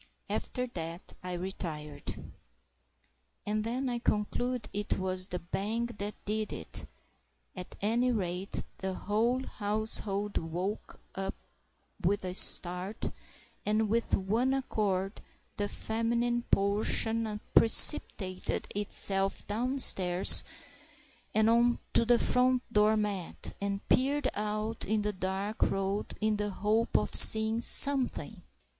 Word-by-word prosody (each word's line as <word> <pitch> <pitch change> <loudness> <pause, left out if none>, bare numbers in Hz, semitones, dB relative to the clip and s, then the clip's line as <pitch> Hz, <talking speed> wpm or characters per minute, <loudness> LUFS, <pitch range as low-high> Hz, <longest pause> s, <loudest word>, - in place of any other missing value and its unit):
After 250 -1 -4
that 170 -6 -8
I 180 0 -7
retired. 170 -5 -7 1.3
And 215 +1 -3
then 250 +4 -4
I 240 -1 -4
conclude 240 +2 -3
it 205 0 -3
was 185 0 -1
the 180 - -5
bang 210 +7 -5
that 205 +1 -6
did 215 +1 -4
it; - - -6 0.7
at 180 -1 -10
any 235 +5 -1
rate, 185 -3 -5 0.2
the 190 -1 -5
whole 230 +7 -2
household 210 -1 -1
woke 180 +6 -7 1.0
with 200 +1 -1
a 180 - -5
start, 180 +3 +5 0.5
and 215 0 -1
with 230 +2 -1
one 230 +8 -2
accord 200 -6 -4 0.4
the 205 0 -3
feminine 235 +2 -3
portion 215 +2 -1
precipitated 190 -6 +3
itself 195 -1 +3
downstairs 205 -6 +6 0.9
and 215 0 +2
on 235 +1 +1 0.2
to 235 - +1
the 240 0 +3
front 250 +1 0
door 215 +1 +2
mat, 205 -4 -6
and 200 0 -5
peered 280 +3 0
out 215 +1 -5
into 210 0 -2
the - - -18
dark 190 +3 -6
road 195 +1 -3
in 215 -1 -1
the 210 0 -4
hope 215 +4 -2
of - - -4
seeing 220 +1 +8
something! 275 +1 +2
210 Hz, 115 wpm, -28 LUFS, 195-230 Hz, 1.3 s, seeing